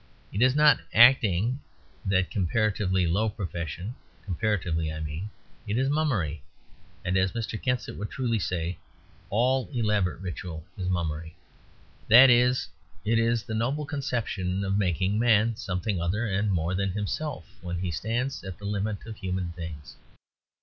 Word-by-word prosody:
It 100 Hz, -, -1 dB
is 130 Hz, +1 st, +5 dB
not 150 Hz, -1 st, +6 dB, 0.2 s
Acting 120 Hz, -1 st, +5 dB, 0.5 s
that 95 Hz, -1 st, +2 dB
comparatively 95 Hz, -1 st, +1 dB
low 100 Hz, +7 st, +1 dB
profession—comparatively 90 Hz, -, -3 dB
I 80 Hz, -, -5 dB
mean. 80 Hz, +6 st, -5 dB, 0.4 s
It 105 Hz, +2 st, 0 dB
is 135 Hz, +2 st, +2 dB
Mummery; 105 Hz, -, 0 dB, 0.6 s
and, 90 Hz, -, 0 dB
as 95 Hz, 0 st, +2 dB
Mr. 115 Hz, -1 st, -4 dB
Kensit 125 Hz, -4 st, -1 dB
would 105 Hz, -, -4 dB
truly 120 Hz, -4 st, -1 dB
say, 90 Hz, -2 st, -2 dB, 0.5 s
all 125 Hz, +5 st, +2 dB
elaborate 105 Hz, -, +1 dB
religious 95 Hz, -, -13 dB
ritual 85 Hz, -3 st, -6 dB
is 90 Hz, -2 st, -3 dB
Mummery. 80 Hz, -2 st, -2 dB, 0.7 s
That 125 Hz, +4 st, +9 dB
is, 125 Hz, +1 st, +3 dB, 0.4 s
it 115 Hz, +2 st, +3 dB
is 115 Hz, 0 st, +2 dB
the 115 Hz, -, -6 dB
noble 130 Hz, +7 st, 0 dB
conception 115 Hz, -10 st, -2 dB
of 95 Hz, 0 st, 0 dB
making 100 Hz, +1 st, +1 dB
Man 115 Hz, -1 st, +4 dB
something 90 Hz, -1 st, -2 dB
other 100 Hz, +7 st, 0 dB
and 100 Hz, 0 st, 0 dB
more 85 Hz, 0 st, 0 dB
than 95 Hz, 0 st, 0 dB
himself 105 Hz, -, -3 dB, 0.2 s
when 90 Hz, -1 st, -4 dB
he 90 Hz, 0 st, -2 dB
stands 120 Hz, -, -2 dB
at 95 Hz, -2 st, -7 dB
the 100 Hz, -, -9 dB
limit 105 Hz, +1 st, -2 dB
of 110 Hz, -2 st, -8 dB
human 95 Hz, -2 st, -3 dB
things. 85 Hz, -4 st, -8 dB
100 Hz, 150 wpm, -27 LUFS, 90-115 Hz, 0.7 s, That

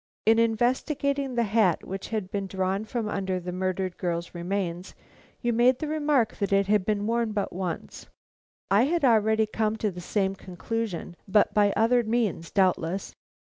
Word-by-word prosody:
In 225 Hz, +1 st, +5 dB
investigating 260 Hz, +4 st, 0 dB
the 235 Hz, -, +2 dB
hat 210 Hz, -5 st, +2 dB
which 195 Hz, +1 st, -5 dB
had 210 Hz, -4 st, -3 dB
been 200 Hz, -2 st, -2 dB
drawn 190 Hz, +2 st, -1 dB
from 225 Hz, -1 st, -3 dB
under 190 Hz, -3 st, -2 dB
the 180 Hz, 0 st, -6 dB
murdered 185 Hz, 0 st, -2 dB
girl's 170 Hz, -1 st, -3 dB
remains, 180 Hz, 0 st, -3 dB, 0.5 s
you 240 Hz, -1 st, 0 dB
made 245 Hz, +2 st, +4 dB
the 310 Hz, -, -4 dB
remark 295 Hz, -7 st, +1 dB
that 200 Hz, -2 st, -2 dB
it 195 Hz, 0 st, +3 dB
had 205 Hz, -1 st, +2 dB
been 210 Hz, -1 st, 0 dB
worn 230 Hz, -1 st, 0 dB
but 205 Hz, -2 st, -2 dB
once. 180 Hz, -2 st, -5 dB, 0.6 s
I 205 Hz, +5 st, +5 dB
had 330 Hz, 0 st, +1 dB
already 220 Hz, -2 st, +4 dB
come 215 Hz, 0 st, -1 dB
to 215 Hz, -2 st, -1 dB
the 180 Hz, 0 st, -8 dB
same 195 Hz, +1 st, 0 dB
conclusion, 190 Hz, 0 st, -5 dB
but 205 Hz, +1 st, +3 dB
by 205 Hz, -1 st, +4 dB
other 240 Hz, +2 st, +4 dB
means, 220 Hz, -7 st, -1 dB
doubtless. 185 Hz, -1 st, 0 dB
210 Hz, 170 wpm, -26 LUFS, 190-230 Hz, 0.6 s, In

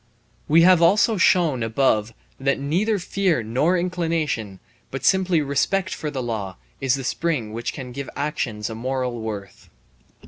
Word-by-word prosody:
We 165 Hz, +2 st, +5 dB
have 180 Hz, -1 st, +6 dB
also 210 Hz, +5 st, +4 dB
shown 170 Hz, -7 st, +3 dB
above 115 Hz, -1 st, +1 dB, 0.3 s
that 140 Hz, +1 st, 0 dB
neither 185 Hz, +10 st, 0 dB
fear 180 Hz, -7 st, 0 dB
nor 130 Hz, +11 st, +1 dB
inclination, 165 Hz, -, -2 dB, 0.3 s
but 135 Hz, -1 st, -5 dB
simply 185 Hz, -4 st, +3 dB
respect 185 Hz, +7 st, 0 dB
for 155 Hz, -, -4 dB
the 135 Hz, -3 st, -4 dB
law, 105 Hz, -6 st, -4 dB, 0.2 s
is 135 Hz, -1 st, +2 dB
the 135 Hz, -, -5 dB
spring 130 Hz, -6 st, -2 dB
which 115 Hz, +1 st, -3 dB
can 125 Hz, -2 st, -8 dB
give 140 Hz, +2 st, -6 dB
actions 135 Hz, -8 st, -2 dB
a -, -, -4 dB
moral 125 Hz, 0 st, -3 dB
worth. 105 Hz, -3 st, -7 dB
140 Hz, 150 wpm, -23 LUFS, 115-170 Hz, 0.3 s, have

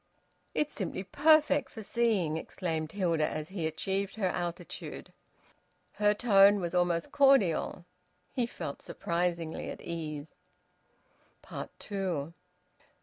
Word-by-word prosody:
"It's 300 Hz, 0 st, 0 dB
simply 190 Hz, -1 st, -3 dB
perfect 290 Hz, +2 st, +4 dB
for 220 Hz, -, -8 dB
seeing," 205 Hz, -9 st, +1 dB
exclaimed 160 Hz, -1 st, -3 dB
Hilda, 170 Hz, -6 st, +1 dB
as 155 Hz, 0 st, -4 dB
he 180 Hz, -5 st, -2 dB
achieved 195 Hz, +4 st, -2 dB
her 215 Hz, -3 st, -1 dB
altitude. 175 Hz, 0 st, -5 dB, 0.8 s
Her 210 Hz, 0 st, +3 dB
tone 205 Hz, -3 st, +6 dB
was 175 Hz, -2 st, -3 dB
almost 175 Hz, -2 st, +1 dB
cordial. 270 Hz, -, +3 dB, 0.5 s
He 245 Hz, -2 st, 0 dB
felt 140 Hz, -11 st, -6 dB
surprisingly 170 Hz, -1 st, -2 dB
at -, -, -6 dB
ease. 155 Hz, -3 st, -5 dB, 1.4 s
TWO. 180 Hz, -7 st, -3 dB
180 Hz, 105 wpm, -31 LUFS, 165-210 Hz, 1.4 s, tone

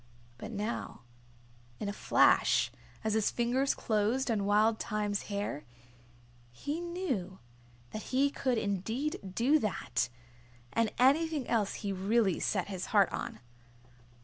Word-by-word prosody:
But -, -, -6 dB
now, 215 Hz, +2 st, -4 dB, 0.8 s
in 210 Hz, -, -3 dB
a 200 Hz, -, -2 dB
flash, -, -, +4 dB, 0.3 s
as 220 Hz, -1 st, 0 dB
his 220 Hz, -1 st, +2 dB
fingers 250 Hz, +3 st, +1 dB
closed 230 Hz, +4 st, +1 dB
on 205 Hz, -3 st, 0 dB
Wild 215 Hz, +2 st, +3 dB
Thyme's 210 Hz, -2 st, -2 dB
hair, 200 Hz, -7 st, -3 dB, 0.9 s
he 290 Hz, -, -4 dB
knew 305 Hz, -, -3 dB, 0.5 s
that 215 Hz, -, -5 dB
he 275 Hz, +2 st, +3 dB
could 260 Hz, -4 st, 0 dB
indeed 220 Hz, +9 st, -2 dB, 0.2 s
do 275 Hz, +8 st, +4 dB
that, 125 Hz, -, -1 dB, 0.6 s
and 230 Hz, -2 st, +2 dB
anything 290 Hz, +2 st, +3 dB
else 215 Hz, -4 st, +1 dB
he 200 Hz, -, 0 dB
really 195 Hz, 0 st, +2 dB
set 190 Hz, -4 st, 0 dB
his 190 Hz, -2 st, -4 dB
heart 200 Hz, -4 st, +4 dB
on. -, -, -5 dB
220 Hz, 125 wpm, -31 LUFS, 200-260 Hz, 0.9 s, flash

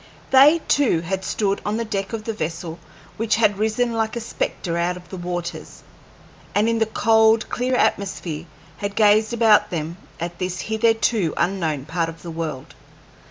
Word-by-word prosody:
They 290 Hz, +5 st, +7 dB
too 260 Hz, -, +3 dB
had 190 Hz, +3 st, -3 dB
stood 200 Hz, -1 st, -1 dB
on 210 Hz, +1 st, -1 dB
the 230 Hz, -, -2 dB
deck 195 Hz, -2 st, -3 dB
of 225 Hz, -2 st, -4 dB
the 225 Hz, -, -3 dB
vessel 165 Hz, -2 st, -5 dB, 0.4 s
which 220 Hz, -1 st, +1 dB
had 205 Hz, -3 st, +2 dB
risen 220 Hz, +2 st, 0 dB
like 225 Hz, -1 st, -1 dB
a -, -, -2 dB
spectre 185 Hz, -6 st, -3 dB
out 175 Hz, +1 st, 0 dB
of 180 Hz, 0 st, -14 dB
the -, -, -7 dB
waters, 175 Hz, -1 st, -5 dB, 0.7 s
and 210 Hz, +2 st, +3 dB
in 230 Hz, 0 st, +1 dB
the 225 Hz, -, +2 dB
cold, 220 Hz, 0 st, +3 dB
clear 250 Hz, +1 st, 0 dB
atmosphere 175 Hz, -8 st, -1 dB, 0.3 s
had 200 Hz, 0 st, -4 dB
gazed 215 Hz, +1 st, +4 dB
about 225 Hz, -3 st, +4 dB
them 165 Hz, 0 st, -4 dB, 0.2 s
at 170 Hz, +1 st, -5 dB
this 185 Hz, 0 st, -3 dB
hitherto 220 Hz, -5 st, +1 dB
unknown 165 Hz, -6 st, -1 dB
part 165 Hz, +1 st, -1 dB
of 165 Hz, -2 st, -11 dB
the 170 Hz, -, -6 dB
world. 160 Hz, -5 st, -5 dB
200 Hz, 170 wpm, -22 LUFS, 170-225 Hz, 0.7 s, They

